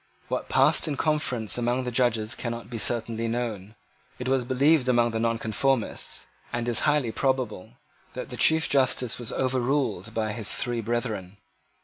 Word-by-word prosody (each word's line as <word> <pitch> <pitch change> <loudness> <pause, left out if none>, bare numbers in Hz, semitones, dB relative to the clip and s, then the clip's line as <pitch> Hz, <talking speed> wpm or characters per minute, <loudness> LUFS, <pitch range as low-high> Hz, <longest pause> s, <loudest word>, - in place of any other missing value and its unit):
What - - -3
passed - - +4
in 145 -3 -2
conference 125 -8 +1
among 120 +2 0
the 125 - -3
judges 115 -3 +1
cannot 115 0 -6
be 115 - -4
certainly 115 +1 +1
known. 110 -3 -4 0.4
It 125 - -5
was 130 -1 +2
believed 135 +2 +3
among 120 -1 +3
the 110 - -2
Nonconformists, 115 +2 -1 0.3
and 120 0 -2
is 120 -2 +3
highly 145 -6 +1
probable, 130 -6 -1 0.4
that - - -7
the - - -5
Chief 160 0 +4
Justice 130 -3 +2
was 120 - -3
overruled 125 -5 -1
by 110 -1 -1
his 110 -2 -4
three 120 -2 -2
brethren. 110 -5 -3
120 Hz, 155 wpm, -26 LUFS, 115-130 Hz, 0.4 s, passed